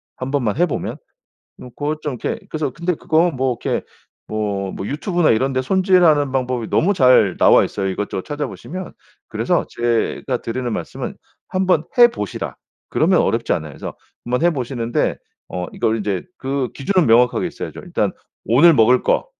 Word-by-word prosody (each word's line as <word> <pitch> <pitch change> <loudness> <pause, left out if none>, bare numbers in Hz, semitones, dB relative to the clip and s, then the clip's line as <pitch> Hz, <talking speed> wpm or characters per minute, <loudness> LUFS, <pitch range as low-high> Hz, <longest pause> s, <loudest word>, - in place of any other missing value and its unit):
1 130 +1 -5
번만 125 -6 0
해 175 - +4
보면. 160 - -4 0.6
뭐 125 - -10
그것 150 +5 -4
좀 145 -4 -3
이렇게 230 - -2
그래서 155 -3 -2
근데 170 +6 -1
그거 160 +3 +2
뭐 130 -4 -1
이렇게 - - -1 0.5
뭐 100 -3 -2
뭐 95 - -5
유튜브나 170 - +1
이런 130 +5 +2
데 130 - +1
손질하는 175 -3 +3
방법이 125 -3 -1
너무 195 +5 +2
잘 125 - +5
나와 - - +6
있어요, 95 -1 -3
이것저것 95 0 -3
찾아보시면. 150 +5 -6 0.4
그래서 - - 0
제가 120 +2 -1
드리는 120 +1 -3
말씀은 - - -5 0.3
"한번 185 -4 +1
해 240 0 +9
보시라." 105 - -5 0.3
그러면 180 +3 +3
어렵지 115 0 0
않아요. 80 -3 -4
그래서 - - -7 0.3
한번 125 +4 -1
해 175 - +5
보시는데 120 -4 -1 0.3
어 90 -1 -4
이걸 110 - 0
인제 100 -3 -2
그 135 -1 -2
기준은 185 +5 +1
명확하게 120 +2 +4
있어야죠. - - -7
일단 - - -1 0.3
오늘 160 +9 +6
먹을 125 0 +4
거, - - +1
130 Hz, 360 characters per minute, -20 LUFS, 115-160 Hz, 0.6 s, 해